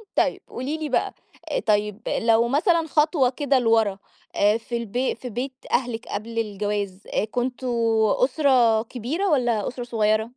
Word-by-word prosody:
طيب، -, -, +1 dB
قولي 280 Hz, +5 st, -4 dB
لي 310 Hz, -2 st, -4 dB
بقى، -, -, 0 dB, 0.5 s
طيب 210 Hz, 0 st, +1 dB, 0.2 s
لو 230 Hz, +1 st, +4 dB
مثلًا 325 Hz, -, +2 dB
خطوة 300 Hz, -4 st, +3 dB
كده 275 Hz, 0 st, +1 dB
لورا، 225 Hz, -4 st, +2 dB, 0.4 s
آآ 210 Hz, +2 st, +3 dB
في 235 Hz, +1 st, -5 dB
البي 235 Hz, +3 st, -2 dB
في 250 Hz, -, -8 dB
بيت 255 Hz, +4 st, -4 dB, 0.2 s
أهلِك 240 Hz, -2 st, -1 dB
قبل 230 Hz, +2 st, -4 dB
الجواز، 205 Hz, -2 st, -3 dB, 0.2 s
كنتم 250 Hz, +1 st, -2 dB, 0.6 s
أسرة 255 Hz, -5 st, +3 dB
كبيرة، 265 Hz, -, -3 dB
والّا 240 Hz, -8 st, +1 dB
أسرة 245 Hz, 0 st, -5 dB
صغيّرة؟ 220 Hz, -2 st, +1 dB
240 Hz, 140 wpm, -24 LUFS, 220-265 Hz, 0.6 s, لو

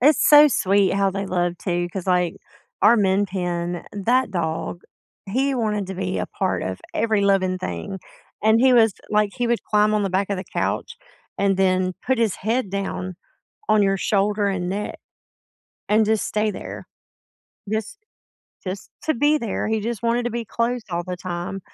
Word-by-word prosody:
It's 290 Hz, +4 st, +4 dB
so 295 Hz, 0 st, +9 dB
sweet 195 Hz, -5 st, +2 dB
how 195 Hz, -1 st, +2 dB
they 195 Hz, +1 st, -3 dB
love 175 Hz, -2 st, 0 dB
too, 175 Hz, -2 st, -1 dB
'cause, 190 Hz, -1 st, -5 dB
like, 180 Hz, -2 st, +1 dB, 0.5 s
our 230 Hz, +3 st, +7 dB
Min 195 Hz, 0 st, +3 dB
Pin, 175 Hz, -2 st, -3 dB
that 230 Hz, +4 st, +1 dB
dog, 170 Hz, -1 st, -3 dB, 0.4 s
he 265 Hz, +7 st, 0 dB
wanted 210 Hz, -5 st, -1 dB
to 190 Hz, -, -5 dB
be 185 Hz, 0 st, -2 dB
a -, -, -2 dB
part 190 Hz, -1 st, -2 dB
of 95 Hz, 0 st, -4 dB
every 220 Hz, -2 st, +1 dB
living 190 Hz, -2 st, +2 dB
thing. 190 Hz, +1 st, -5 dB, 0.4 s
And 220 Hz, +2 st, +4 dB
he 260 Hz, 0 st, +5 dB
was 225 Hz, -4 st, +5 dB, 0.2 s
like, 210 Hz, -1 st, +2 dB
he 245 Hz, -2 st, -1 dB
would 235 Hz, 0 st, 0 dB
climb 210 Hz, 0 st, +3 dB
on 210 Hz, -, +2 dB
the 195 Hz, -, -1 dB
back 190 Hz, +1 st, 0 dB
of 200 Hz, -, 0 dB
the 185 Hz, -, -5 dB
couch, 470 Hz, -, -2 dB, 0.4 s
and 195 Hz, -1 st, +2 dB
then 185 Hz, -1 st, +2 dB
put 260 Hz, -2 st, +2 dB
his 225 Hz, -4 st, +1 dB
head 220 Hz, -1 st, -1 dB
down 195 Hz, -2 st, -3 dB, 0.5 s
on 215 Hz, -1 st, +4 dB
your 195 Hz, 0 st, +2 dB
shoulder 205 Hz, +1 st, +1 dB
and 180 Hz, -2 st, -2 dB
neck, 205 Hz, +2 st, -4 dB, 0.9 s
and 215 Hz, +1 st, +4 dB
just 220 Hz, 0 st, +1 dB
stay 215 Hz, 0 st, 0 dB
there. -, -, -8 dB, 0.8 s
Just 220 Hz, -, -3 dB, 0.7 s
just 185 Hz, +1 st, -6 dB
to 315 Hz, -, +2 dB
be 295 Hz, +5 st, +3 dB
there, 230 Hz, -6 st, -2 dB
he 220 Hz, -1 st, 0 dB
just 230 Hz, 0 st, -4 dB
wanted 235 Hz, +1 st, +1 dB
to 240 Hz, -, -1 dB
be 235 Hz, 0 st, -3 dB
close 235 Hz, +2 st, -1 dB
all 170 Hz, 0 st, -1 dB
the 180 Hz, -1 st, -4 dB
time, 180 Hz, +1 st, -5 dB
200 Hz, 180 wpm, -22 LUFS, 185-225 Hz, 0.9 s, so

